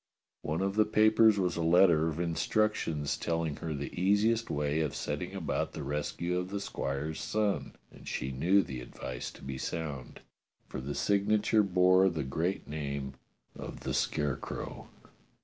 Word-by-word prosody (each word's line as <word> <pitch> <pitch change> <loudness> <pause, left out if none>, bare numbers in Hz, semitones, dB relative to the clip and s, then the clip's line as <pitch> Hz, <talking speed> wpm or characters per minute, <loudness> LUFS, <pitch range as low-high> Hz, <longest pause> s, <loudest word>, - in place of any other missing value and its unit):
One 80 +3 -2
of 95 +1 -1
the 110 - +6
papers 110 0 +5
was 90 -3 +1
a 85 - -2
letter 85 -1 +5
of 80 0 -3
instructions 85 -3 0
telling 80 -3 -2
her 80 -2 -4
the 70 0 -5
easiest 105 +5 +2
way 75 +1 0
of 75 -3 -1
setting - - -3
about - - -2
the - - -5
rescue 85 +5 -2
of 90 0 -4
the 100 +1 -3
squire's 75 -5 -3
son, 105 -1 -1 0.2
and - - -14
she 65 - -3
knew 90 +10 +3
the 65 -5 -6
advice 60 +1 -6
to - - -14
be 65 -1 -5
sound, 75 -6 -5 0.5
for - - -5
the 70 +2 -4
signature 105 +2 +3
bore 95 0 +4
the 80 -5 -3
great 80 +8 -2
name 70 -2 -4 0.4
of - - -8
the - - -3
Scarecrow. 75 -2 -2
85 Hz, 160 wpm, -31 LUFS, 75-100 Hz, 0.5 s, the